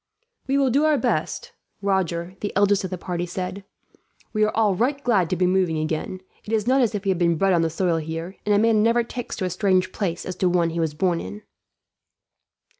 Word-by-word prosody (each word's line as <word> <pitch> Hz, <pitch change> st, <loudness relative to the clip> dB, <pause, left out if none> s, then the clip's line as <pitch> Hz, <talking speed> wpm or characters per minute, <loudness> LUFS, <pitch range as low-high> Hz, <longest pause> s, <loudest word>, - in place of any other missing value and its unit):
"We 270 Hz, +1 st, +2 dB
will 270 Hz, -2 st, +3 dB
do 280 Hz, +5 st, +3 dB
our 310 Hz, -1 st, +4 dB
best," 485 Hz, -, -1 dB, 0.3 s
Roger, 185 Hz, -3 st, -1 dB
the 205 Hz, -, -3 dB
eldest 200 Hz, 0 st, +3 dB
of 185 Hz, -, -3 dB
the 185 Hz, -, -4 dB
party, 175 Hz, 0 st, -3 dB
said. 185 Hz, +2 st, -5 dB, 0.7 s
"We 215 Hz, -1 st, +2 dB
are 215 Hz, -, +3 dB
all 215 Hz, -3 st, +3 dB
right 250 Hz, +9 st, +1 dB
glad 195 Hz, -9 st, +2 dB
to -, -, 0 dB
be 180 Hz, +1 st, +1 dB
moving 180 Hz, -3 st, +2 dB
again. 155 Hz, +4 st, -3 dB, 0.2 s
It 215 Hz, -, -8 dB
is 215 Hz, -2 st, +1 dB
not 265 Hz, +2 st, +3 dB
as 230 Hz, -3 st, +1 dB
if 200 Hz, -, -3 dB
we -, -, +1 dB
had 185 Hz, -2 st, +1 dB
been 170 Hz, -1 st, +3 dB
bred 195 Hz, +3 st, +3 dB
on 170 Hz, -, +3 dB
the 165 Hz, -, +1 dB
soil 170 Hz, 0 st, 0 dB
here, 165 Hz, +4 st, -5 dB
and 210 Hz, -1 st, +2 dB
a -, -, +4 dB
man 220 Hz, 0 st, +4 dB
never 230 Hz, +2 st, +3 dB
takes 245 Hz, +1 st, -6 dB
to 190 Hz, -, -2 dB
a -, -, -1 dB
strange 185 Hz, 0 st, +1 dB
place 175 Hz, -5 st, -3 dB
as 185 Hz, -, -4 dB
to 185 Hz, -, +2 dB
one 170 Hz, -2 st, +2 dB
he 170 Hz, -, -3 dB
was 160 Hz, -2 st, -1 dB
born 175 Hz, +1 st, +1 dB
in." 100 Hz, +3 st, -8 dB
185 Hz, 235 wpm, -23 LUFS, 170-215 Hz, 0.7 s, our